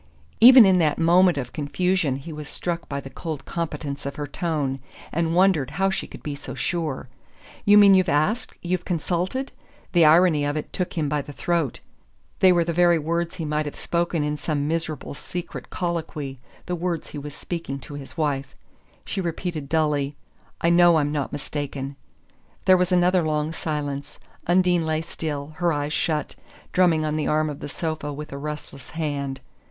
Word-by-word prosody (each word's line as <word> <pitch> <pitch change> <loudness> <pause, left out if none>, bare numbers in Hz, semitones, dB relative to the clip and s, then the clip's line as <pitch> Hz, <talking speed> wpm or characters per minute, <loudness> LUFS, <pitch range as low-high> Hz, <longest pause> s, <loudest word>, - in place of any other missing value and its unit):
Even 250 0 +10
in 190 -2 +5
that 155 -3 +2
moment 175 0 +5
of 125 -3 -4
confusion 160 0 0
he 140 +4 -7
was 150 -1 -7
struck 170 -1 -3
by 140 - -2
the 135 - -8
cold 155 -1 -6
competence 150 -4 -4
of 140 - -5
her 145 - -3
tone, 145 -3 -2 0.3
and 165 +1 0
wondered 180 -7 +4
how 195 0 +2
she 190 - -3
could - - -12
be 150 - -3
so 140 - -8
sure. 160 -7 -2 0.6
"You 205 0 +7
mean 200 -1 +8
you've 185 -2 +4
asked 170 +11 +1
you've 180 0 -1
consulted 180 - -2 0.2
?" - - -30
The 170 -3 +6
irony 160 -1 +5
of 145 +1 -1
it 150 - -5
took 180 - -2
him 155 -2 +1
by 150 0 0
the 145 - -9
throat. 165 -4 -1 0.6
They 185 - +7
were 175 -1 +4
the 170 0 -2
very 175 0 +5
words 170 +2 -2
he 165 -3 -4
might 150 0 -1
have 145 - -6
spoken 170 -2 -1
in 150 0 -1
some 145 -2 -1
miserable 160 -3 -2
secret 175 +4 -7
colloquy 160 -6 -3 0.3
the 180 - -3
words 175 -1 -3
he 150 - -5
was 145 0 -8
speaking 165 -6 -5
to 145 - -10
his 145 +3 -9
wife! 145 -3 -1 0.5
She 195 - -3
repeated 170 -4 -4
dully: 150 -3 +1 0.5
"I 170 - +3
know 175 0 +6
I'm 145 -1 +1
not 145 -2 -2
mistaken." 140 -1 -4 0.7
There 185 - +7
was 180 0 +1
another 180 0 +4
long 155 0 -1
silence. 145 -3 -4 0.3
Undine 180 -1 +3
lay 160 0 0
still, 155 -3 -5
her 175 0 +2
eyes 145 0 -2
shut, 155 -2 -1 0.4
drumming 170 -4 +3
on 155 0 -1
the 155 - -1
arm 155 0 +1
of 145 - -8
the - - -6
sofa 155 -2 -3
with 150 +1 -7
a - - -5
restless 150 -3 -7
hand. 140 -4 -2
155 Hz, 185 wpm, -24 LUFS, 145-175 Hz, 0.7 s, Even